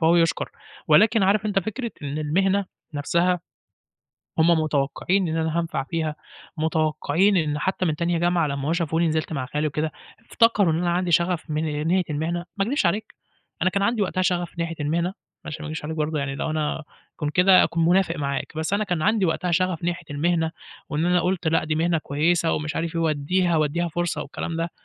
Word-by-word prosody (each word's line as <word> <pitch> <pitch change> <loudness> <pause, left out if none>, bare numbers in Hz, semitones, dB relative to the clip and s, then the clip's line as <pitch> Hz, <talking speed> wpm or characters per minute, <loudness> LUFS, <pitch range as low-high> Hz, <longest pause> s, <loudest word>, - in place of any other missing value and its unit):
فهو 165 +1 +4
يُشكر. 165 -1 +1 0.4
ولكن 210 +7 +5
عارف 205 +3 +3
أنت 205 -1 +1
فكرة 220 +5 -3
إن 145 +1 -3
المهنة 190 +6 +1 0.3
نَفْسها 170 +5 +1 1.0
هُم 160 +2 +5
متوقّعين 160 +4 +1
إن 160 - -1
أنا 160 +1 0
هانفع 165 -5 -1
فيها، 160 0 -2 0.4
متوقّعين 160 +4 +1
إن 150 -3 +1
حتّى 185 +4 -1
من 155 - 0
تانية 170 +1 0
جامعة 175 -1 +2
لمّا 140 0 -3
هُم - - +2
شافوني 170 -1 +1
نزَلت 155 0 -1
مع 135 -4 -2
خالي 150 +4 -1
وكده، 155 +1 -2 0.4
افتكروا 210 -7 +4
إن 160 - 0
أنا 175 0 0
عَندي 175 0 0
شغف 170 -1 +1
من 155 0 -1
ناحية 185 +2 +3
المهنة. 165 +4 -2
ما 195 - +1
اكدبش 235 -3 +1
عليك 205 +5 -1 0.5
أنا 185 - +3
كان 200 +1 0
عَندي 220 +1 +1
وقتها 185 -1 0
شغف 175 -1 -1
ناحية 165 0 -2
المهنة، 165 +4 0
ما 190 - -8 0.3
عشان 155 - -6
ما - - -5
اكدبش 155 -1 -5
عليك 160 +1 -4
برضه 155 0 -1
يعني 140 -1 -2
لو 140 - -3
أنا 155 0 -1 0.3
كنت 150 -2 -2
كده 185 +1 +7
هاكون 165 -1 +1
منافق 175 -1 +3
معاك، 140 -1 -3
بس 160 +4 -2
أنا 205 +1 +2
كان 180 -5 -1
عَندي 215 0 +2
وقتها 175 +2 -1
شغف 180 -1 0
ناحية 175 -1 -2
المهنة 160 +2 0 0.4
وإن 155 +2 -1
أنا 180 0 +3
قُلت 180 -1 -1
لأ، 165 - +2
دي 155 0 -1
مهنة 165 +1 +1
كويسة 160 +3 +1
ومش 150 0 -2
عارف 165 0 -2
إيه 165 - +1
واديها 165 +3 +1
واديها 155 +3 +1
فرصة 175 +1 -2
والكلام 165 - -5
ده 165 +1 -2
165 Hz, 200 wpm, -24 LUFS, 155-180 Hz, 1.0 s, كده